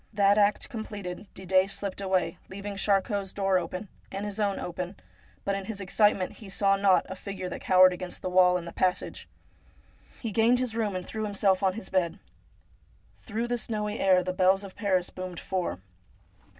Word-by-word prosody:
That 200 0 +4
act 205 0 +2
com 225 -2 -5
pleted, 200 -2 -7
Didet 190 +1 +2
slipped 200 0 -4
away, 185 -4 0
leaving 200 +1 -6
Charcot's 195 0 0
door 195 -2 +2
open, 180 +4 -5 0.2
and 195 +1 -4
his 205 0 -5
own 200 -2 +1
open; 180 +2 -5 0.5
but 200 - +1
in 195 -1 -3
his 205 -1 -5
excitement 200 0 +2
he 210 - -11
saw 195 0 +3
not 195 -2 +4
a 190 - -6
figure 185 -1 -6
that - - -6
cowered 185 0 +6
against 180 0 -7
the - - -1
wall 180 0 +5
in 175 - -6
the 170 - -7
passage. 185 -1 -1 0.9
He 225 - -4
gained 230 +4 +4
his 250 -2 -1
room, 215 -4 -1
and 180 0 -4
threw 220 0 -4
himself 200 -2 +2
on 190 -1 +2
his 200 -1 -7
bed. 180 -3 +1 1.0
Through 225 +1 -3
the 240 0 -1
snowy 210 -1 -2
air 185 -1 +4
the 185 +1 -2
bells 190 +1 +3
of 195 -2 -9
Paris 185 -4 0
boomed 185 -2 -6
four. 180 - -3
195 Hz, 190 wpm, -28 LUFS, 185-205 Hz, 1.0 s, cowered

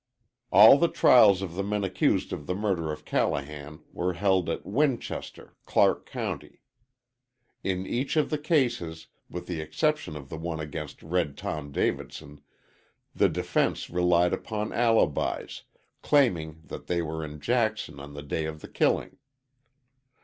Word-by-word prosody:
All 110 +7 +9
the 170 - +4
trials 105 - +5
of 90 -3 -5
the 95 - -2
men 105 0 -1
accused 95 -1 0
of 75 - -6
the 90 - -1
murder 95 -6 -1
of 75 - -8
Callahan 75 +2 -2
were 90 +1 -1
held 95 0 +1
at - - -3
Winchester, 135 +3 -2
Clark - - +2
County. - - -6 1.0
In 95 -1 -1
each 130 +9 -2
of 155 - +2
the 150 - 0
cases, 120 - 0 0.2
with 90 - -6
the 85 -3 -4
exception 150 - -1
of 70 -3 -9
the 80 - -6
one 80 -1 -4
against 75 -1 -7
Red 80 -4 -1
Tom 70 -2 -5
Davidson, 70 +1 -3 0.7
the - - +3
defense - - -1
relied 90 0 +3
upon 105 -1 -3
alibis, 115 - +1 0.4
claiming 80 - +1
that - - -9
they 85 -1 0
were 80 0 -4
in 75 0 -7
Jackson 110 - -1
on 70 +1 -10
the 75 - -7
day 80 +2 -2
of 80 -1 -6
the - - -9
killing. - - 0
90 Hz, 150 wpm, -27 LUFS, 80-110 Hz, 1.0 s, All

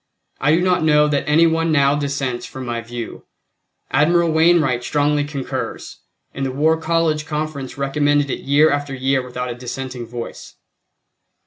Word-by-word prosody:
I 150 +3 +3
do 170 - +1
not 180 -2 +2
know 150 -1 +4
that 145 0 -1
any 160 +3 +5
one 165 0 +1
now 140 -2 +4
dissents 140 -4 -2
from 130 -1 -8
my 120 -1 -3
view. 115 0 -7 0.7
Admiral 170 +4 +3
Wainwright 160 -6 +3
strongly 145 +2 +1
concurs, 145 -2 -5 0.3
and 135 - -4
the 135 - -1
War 155 +4 +2
College 160 -1 0
Conference 150 -4 -4
recommended 145 0 +1
it - - -3
year 145 +3 +3
after 145 -1 -2
year 135 +1 +1
without 125 0 -5
a - - -3
dissenting 125 0 -6
voice. 120 0 -8
145 Hz, 155 wpm, -20 LUFS, 130-155 Hz, 0.7 s, any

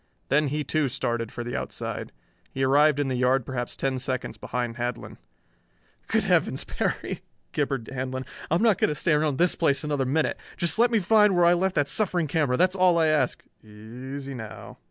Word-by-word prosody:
Then 150 +2 +3
he 150 +2 -2
too 150 0 0
started 120 -3 -2
for 120 - -5
the 120 - -5
outside. - - -4 0.4
He 135 - -2
arrived 145 +2 +4
in 145 - 0
the 130 - -1
yard 125 0 +2
perhaps 120 -2 -4
ten 135 -1 -1
seconds 130 0 -3
behind 120 0 -4
Handlon. 120 0 -4 0.9
"Good - - +1
Heavens, - - +1
Perry," - - -3 0.3
gibbered 135 -5 -1
Handlon. 130 0 -4 0.2
"I'm 170 +7 +2
not 220 -6 +4
going - - +3
to 150 - -2
stay 165 +4 0
around 150 -2 +1
this 175 +1 +3
place 145 -3 +1
another 145 -3 -1
minute. 150 +4 0 0.2
Just 170 +5 +2
let 240 +1 +5
me 230 - +2
find 210 0 +4
where 175 -1 +4
I 170 - +6
left 185 +2 0
that 145 -2 +2
suffering 180 -4 +1
camera, 145 -4 +1
that's 185 +1 +3
all 180 -2 +4
I 160 -1 +3
ask." 145 -5 +1 0.2
"Easy 125 +6 -8
now." 110 -3 -9
140 Hz, 195 wpm, -26 LUFS, 130-170 Hz, 0.9 s, I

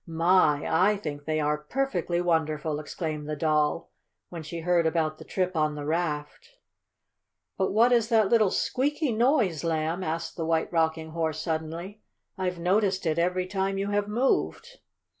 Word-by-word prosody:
"My, 165 -3 +3
I 190 +6 +3
think 145 -6 -6
they 155 0 0
are 150 0 0
perfectly 175 - -1
wonderful!" 155 -3 0
exclaimed 155 -1 -5
the 150 - -2
Doll, 150 +1 0 0.4
when 170 -2 -7
she 165 +2 -6
heard 170 -1 +2
about 155 -1 -1
the - - -9
trip 185 -1 -2
on 155 -1 +1
the 145 -1 -6
raft. 155 - -3 1.0
"But 190 - 0
what 230 +4 +4
is 235 -2 +3
that 220 -4 +4
little 220 -4 +4
squeaky 290 - 0
noise, 225 - +2
Lamb?" 165 +2 -1
asked 165 +1 -4
the 165 - -2
White 165 +1 0
Rocking 160 -1 0
Horse 160 -1 -2
suddenly. 165 +6 -4 0.3
"I've 185 -2 -2
noticed 190 +2 +1
it 160 0 +1
every 180 +1 +1
time 195 +1 -2
you 200 +1 -2
have 205 0 0
moved." 270 - -1
170 Hz, 160 wpm, -27 LUFS, 155-195 Hz, 1.0 s, what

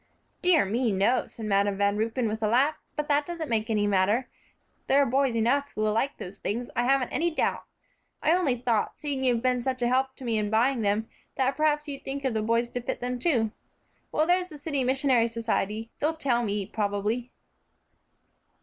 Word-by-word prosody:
"Dear 360 - +4
me, 230 +4 0
no," 200 +6 +2
said 225 - -8
Madam 200 -1 +1
Van 200 0 +2
Ruypen, 225 +3 -1
with 220 +1 -3
a 215 - +2
laugh, 260 +7 +3 0.2
"but 300 0 -2
that 290 0 +3
doesn't 325 -3 -5
make 220 0 0
any 210 -2 +1
matter. 205 +5 +2 0.6
There 275 - +4
are 285 - +5
boys 265 -1 +1
enough 270 +6 +1
who 215 - -2
will 215 0 +2
like 270 +6 0
those 190 +2 -9
things, 240 +4 -3
I 240 - +1
haven't 265 -1 +2
any 340 +1 +1
doubt. 315 - -1 0.6
I 315 - +4
only 345 -8 +2
thought, 235 -3 -1
seeing 285 -3 -3
you've 245 -2 +2
been 250 -1 +2
such 255 0 -2
a - - +3
help 260 +1 +1
to - - -10
me 230 -3 0
in 210 -1 -1
buying 235 +3 +2
them, 210 +2 0 0.3
that 265 +1 +1
perhaps 300 0 +1
you'd 280 -2 -6
think 275 +1 -4
of 260 - +1
the 220 - 0
boys 230 +2 +1
to 245 - -4
fit 235 - -4
them 250 0 -3
to. 240 -7 +2 0.6
Well, 310 - +2
there's 360 +1 +2
the 305 - -10
City 285 -2 -1
Missionary 260 -2 +3
Society; 225 -1 -2
they'll 320 +2 0
tell 255 -6 +1
me, 205 -3 -1
probably." 210 +4 -2
245 Hz, 205 wpm, -27 LUFS, 220-275 Hz, 0.6 s, are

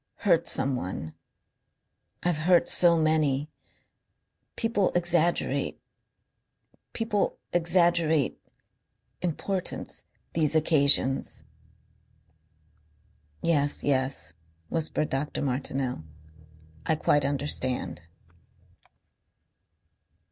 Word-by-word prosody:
Hurt 170 -4 +3
someone. 95 - -1 1.1
I've 175 -3 +1
hurt 175 -1 +5
so 170 -1 +5
many. 155 -2 +1 1.0
People 225 -4 0
exaggerate...People 175 +5 -2 0.2
exaggerate 170 -3 +2 0.8
importance 180 +2 -4 0.3
these 160 -2 +1
occasions." 140 -3 +3 2.0
"Yes, 145 -4 +2
yes," 130 - 0 0.4
whispered 155 -1 -1
Dr. 140 +3 -2
Martineau. 130 - -2 0.8
"I 160 - +3
quite 145 -1 +2
understand." 135 - -2
155 Hz, 60 wpm, -27 LUFS, 135-170 Hz, 2.0 s, hurt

